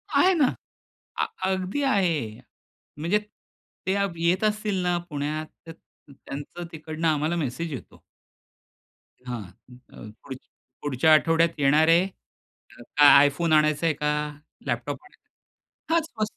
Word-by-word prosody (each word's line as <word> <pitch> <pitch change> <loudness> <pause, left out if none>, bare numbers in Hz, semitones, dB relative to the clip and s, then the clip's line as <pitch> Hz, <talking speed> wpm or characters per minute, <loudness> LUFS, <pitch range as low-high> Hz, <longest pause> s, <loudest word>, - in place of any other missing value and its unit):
आहे 375 +1 +5
ना. 295 -7 +2 0.7
अ - - +2 0.3
अगदी 190 +9 -2
आहे. 170 - 0 0.6
म्हणजे 180 +7 +1 0.7
ते 190 - +2 0.3
येत 185 +5 +2
असतील 210 -3 0
ना 175 0 +1
पुण्यात 150 +2 -3 0.2
त - - -7 0.4
त्यांचं 145 +5 -8
तिकडनं 160 +1 -3
आम्हाला 155 +2 +1
मेसेज 155 +1 -3
येतो. 130 - -10 1.2
हां, 120 -3 -4 0.5
अ, 110 - -10
पुढच 130 -1 -8 0.4
पुढच्या 145 +3 +3
आठवड्यात 165 +2 +4
येणार 150 +3 +4
आहे. 170 +3 +5 0.9
अ, - - +8 0.2
iPhone 160 +3 0
आणायचंय 155 +1 +2
का 150 +1 -1 0.6
लॅपटॉप 120 +3 -3
आणायचा? 330 -3 -12
हां, 335 - +4
स्व 220 -9 -4
160 Hz, 115 wpm, -25 LUFS, 145-185 Hz, 1.2 s, अ